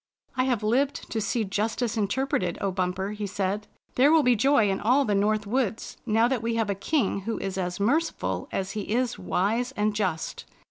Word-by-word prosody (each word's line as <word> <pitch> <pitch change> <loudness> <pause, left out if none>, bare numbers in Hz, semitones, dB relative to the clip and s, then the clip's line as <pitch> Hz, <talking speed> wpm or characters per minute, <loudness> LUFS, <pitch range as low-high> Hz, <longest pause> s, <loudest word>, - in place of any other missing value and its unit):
"I 255 - +2
have 245 -5 0
lived 265 +6 0
to 220 - -1
see 220 +3 0
justice 215 +4 -1
interpreted, 205 -4 0
O 195 - -1
Bumper," 185 +1 -1
he 210 -1 -4
said. 200 +1 -2
" - - -41
There 265 +3 +6
wiU 320 -1 +5
be 250 -1 +4
joy 250 -1 +4
in 195 - -1
all 260 +6 +3
the 210 - +1
North 210 +1 +1
Woods 230 0 -2
now 225 +2 +4
that 255 -3 -1
we 230 0 -1
have 225 -3 +1
a - - +1
king 200 +1 0
who 225 +3 -3
is 195 -1 -3
as 180 -1 -3
merciful 295 +11 0
as 195 0 -2
he 210 +1 -3
is 250 -1 0
wise 205 - 0
and 210 -3 0
just. 185 -6 -2
215 Hz, 205 wpm, -26 LUFS, 195-245 Hz, -, There